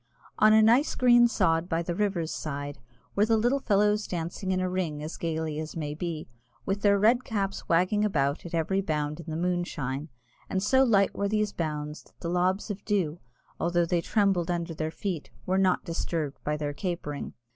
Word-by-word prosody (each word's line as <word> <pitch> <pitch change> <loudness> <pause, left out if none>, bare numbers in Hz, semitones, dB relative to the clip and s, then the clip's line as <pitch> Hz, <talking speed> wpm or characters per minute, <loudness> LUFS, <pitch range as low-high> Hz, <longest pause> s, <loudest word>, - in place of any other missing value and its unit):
On 215 0 +7
a 220 0 +6
nice 240 +7 +4
green 240 -1 +6
sod 175 -6 +1
by 165 0 0
the 175 - -2
river's 180 -4 -1
side 145 -1 -5 0.4
were 200 - +4
the 225 0 +4
little 240 +5 +2
fellows 210 -2 +2
dancing 175 +2 -3
in 185 - +1
a 185 - 0
ring 170 -5 -2
as 155 - -5
gaily 160 -2 -2
as 155 0 -6
may 150 -3 -3
be, 165 -1 -4 0.4
with 195 +1 -1
their 200 0 +4
red 235 +5 +4
caps 200 -3 -3
wagging 185 +5 +3
about 140 -8 0
at 170 -1 -5
every 190 +4 +1
bound 150 -3 -2
in 165 - -8
the 155 - -3
moonshine, 165 -5 -2 0.4
and 190 0 -1
so 260 +5 +4
light 200 -6 +3
were 200 0 -1
these 210 -1 0
bounds 150 -2 -3
that - - -26
the 170 - -4
lobs 185 +4 +1
of 205 - -7
dew, 180 -6 0 0.4
although 175 0 +2
they 170 0 +1
trembled 195 -3 +1
under 170 -1 -2
their 155 0 -2
feet, 175 -1 -4 0.2
were 190 +1 +1
not 185 -1 +2
disturbed 165 -4 -3
by 150 0 -1
their 145 -1 -3
capering. 160 -4 -4
175 Hz, 195 wpm, -28 LUFS, 160-200 Hz, 0.4 s, On